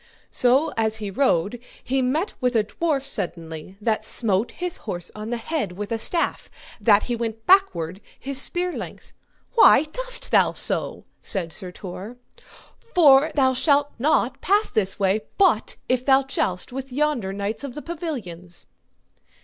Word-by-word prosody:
So 255 Hz, +5 st, +2 dB
as 220 Hz, -1 st, +1 dB
he 210 Hz, -2 st, -5 dB
rode 205 Hz, -2 st, +1 dB, 0.2 s
he 265 Hz, +1 st, 0 dB
met 295 Hz, +10 st, -1 dB
with 250 Hz, -1 st, 0 dB
a 220 Hz, -, +4 dB
dwarf 280 Hz, +4 st, -2 dB
suddenly 170 Hz, -, -5 dB
that 220 Hz, 0 st, 0 dB
smote 220 Hz, -1 st, +1 dB
his 360 Hz, -1 st, -5 dB
horse 175 Hz, -5 st, -6 dB
on 215 Hz, +1 st, -7 dB
the 240 Hz, -, -2 dB
head 230 Hz, -, -3 dB
with 205 Hz, +3 st, -6 dB
a 225 Hz, -, -1 dB
staff, 335 Hz, +8 st, 0 dB, 0.3 s
that 210 Hz, -3 st, +4 dB
he 240 Hz, -, -2 dB
went 225 Hz, -1 st, -5 dB
backward 200 Hz, -, +3 dB, 0.2 s
his 270 Hz, 0 st, +3 dB
spear 355 Hz, +2 st, 0 dB
length. -, -, -8 dB, 0.4 s
Why 460 Hz, -, +7 dB
dost -, -, -2 dB
thou -, -, +4 dB
so? -, -, -2 dB, 0.2 s
said 170 Hz, -5 st, -2 dB
Sir 185 Hz, -3 st, -6 dB
Tor. 195 Hz, +6 st, -9 dB, 0.6 s
For 310 Hz, -, +4 dB
thou 260 Hz, -2 st, +3 dB
shalt 285 Hz, +2 st, +2 dB
not 265 Hz, -2 st, +1 dB
pass 410 Hz, +3 st, +2 dB
this 195 Hz, -2 st, +1 dB
way, 200 Hz, +2 st, +2 dB, 0.2 s
but 365 Hz, -, +3 dB
if 255 Hz, 0 st, +1 dB
thou 270 Hz, 0 st, +4 dB
joust 190 Hz, -6 st, -2 dB
with 270 Hz, 0 st, -6 dB
yonder 275 Hz, -7 st, 0 dB
knights 200 Hz, +5 st, -4 dB
of 275 Hz, -3 st, -6 dB
the 295 Hz, -, -6 dB
pavilions. 215 Hz, -, -5 dB
245 Hz, 155 wpm, -23 LUFS, 200-290 Hz, 0.6 s, Why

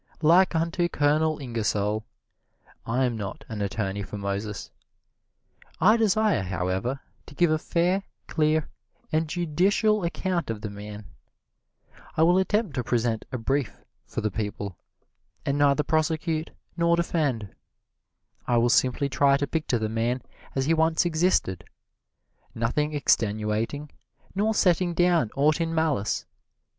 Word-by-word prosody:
Like 175 Hz, +3 st, +5 dB
unto 170 Hz, +2 st, +1 dB
Colonel 155 Hz, +1 st, +2 dB
Ingersoll, 110 Hz, -4 st, -1 dB, 0.8 s
I 125 Hz, +3 st, +1 dB
am 120 Hz, -2 st, -1 dB
not 100 Hz, -3 st, -6 dB
an 110 Hz, -2 st, -5 dB
attorney 100 Hz, 0 st, -2 dB
for 105 Hz, +1 st, -6 dB
Moses. 100 Hz, +1 st, -4 dB, 1.1 s
I 215 Hz, +4 st, +6 dB
desire, 220 Hz, -, +2 dB
however, 95 Hz, +7 st, -2 dB, 0.3 s
to 145 Hz, -, -13 dB
give 175 Hz, 0 st, +3 dB
a 155 Hz, -, +2 dB
fair, 175 Hz, +4 st, +1 dB, 0.2 s
clear 155 Hz, -1 st, +1 dB, 0.4 s
and 155 Hz, 0 st, +1 dB
judicial 185 Hz, +5 st, +2 dB
account 175 Hz, -1 st, -1 dB
of 110 Hz, -2 st, -3 dB
the 105 Hz, -, -5 dB
man. 105 Hz, 0 st, -8 dB, 1.1 s
I 160 Hz, -, +5 dB
will 175 Hz, +3 st, +5 dB
attempt 205 Hz, -2 st, 0 dB
to 125 Hz, -, 0 dB
present 115 Hz, -1 st, 0 dB
a 130 Hz, -, -2 dB
brief 130 Hz, 0 st, -1 dB, 0.3 s
for -, -, -4 dB
the 110 Hz, -, -1 dB
people, 100 Hz, -2 st, -4 dB, 0.7 s
and 140 Hz, +1 st, 0 dB
neither 145 Hz, +1 st, +4 dB
prosecute 155 Hz, 0 st, 0 dB, 0.3 s
nor 170 Hz, 0 st, +3 dB
defend. 145 Hz, -, -1 dB, 1.0 s
I 120 Hz, -, +3 dB
will 120 Hz, +1 st, +3 dB
simply 130 Hz, +3 st, +2 dB
try 140 Hz, +2 st, +3 dB
to 145 Hz, -, -1 dB
picture 150 Hz, -4 st, -1 dB
the 110 Hz, -1 st, -1 dB
man 115 Hz, +3 st, -1 dB, 0.3 s
as 135 Hz, -1 st, +1 dB
he 160 Hz, -, +3 dB
once 160 Hz, +1 st, +2 dB
existed, 160 Hz, -, +1 dB, 0.9 s
nothing 150 Hz, +7 st, 0 dB
extenuating, 110 Hz, +3 st, 0 dB, 0.4 s
nor 215 Hz, +3 st, +1 dB
setting 175 Hz, -2 st, +2 dB
down 175 Hz, -8 st, +3 dB
aught 150 Hz, +4 st, +3 dB
in 165 Hz, 0 st, -1 dB
malice. 150 Hz, -10 st, 0 dB
145 Hz, 135 wpm, -26 LUFS, 110-170 Hz, 1.1 s, I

